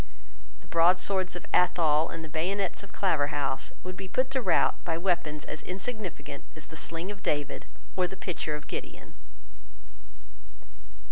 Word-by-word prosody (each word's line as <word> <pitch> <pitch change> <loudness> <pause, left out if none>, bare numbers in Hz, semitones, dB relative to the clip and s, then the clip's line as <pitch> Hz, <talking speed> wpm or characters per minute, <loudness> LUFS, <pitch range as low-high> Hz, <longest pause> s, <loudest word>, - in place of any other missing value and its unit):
The - - -17
broadswords 180 +2 +4
of 175 - -6
Athol 165 -3 +4
and 165 -1 -5
the - - -7
bayonets 180 +6 0
of 200 - -11
Claverhouse 145 -6 +1
would 185 0 -5
be 190 +1 -6
put 255 +7 +1
to 265 -1 +1
rout - - +3
by 165 -2 0
weapons 170 -4 0
as 155 - -5
insignificant 195 0 -4
as 155 - -7
the 160 - -8
sling 165 +4 -3
of 200 -2 -9
David 145 -1 -1 0.3
or 185 -1 +3
the 190 - -8
pitcher 170 -5 -2
of 150 0 -6
Gideon. - - -6
175 Hz, 150 wpm, -30 LUFS, 155-190 Hz, 0.3 s, broadswords